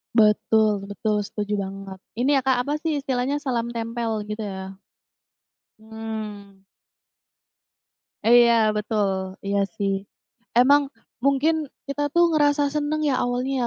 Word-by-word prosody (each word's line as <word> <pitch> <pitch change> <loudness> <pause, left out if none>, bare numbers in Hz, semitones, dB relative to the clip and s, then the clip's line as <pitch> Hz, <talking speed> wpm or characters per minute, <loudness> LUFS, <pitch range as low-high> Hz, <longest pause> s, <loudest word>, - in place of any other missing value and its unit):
Betul 215 -1 +4
betul, 210 +1 -1
setuju 210 0 -4
banget. 195 -1 -6 0.2
Ini 270 +4 +3
ya, - - -4
Kak, 260 -2 +4
apa 290 +2 -2
sih 305 -3 -2
istilahnya, 260 +1 -1
salam 235 -4 -1
tempel, 230 -2 -2
gitu 210 0 -4
ya? 190 0 -6 1.1
Mmm. 215 -3 -8 1.6
Iya, 235 +1 +6 0.2
betul. 195 -3 -1
Iya, 200 0 0 0.2
sih. 195 -1 0 0.6
Emang 280 +3 +5 0.4
mungkin 295 +3 +2 0.2
kita 290 +1 -1
tuh 345 0 +4
ngerasa 290 -2 +2
senang 300 +1 -1
ya 280 -4 +1
awalnya 250 +1 -1
230 Hz, 120 wpm, -24 LUFS, 210-280 Hz, 1.6 s, Iya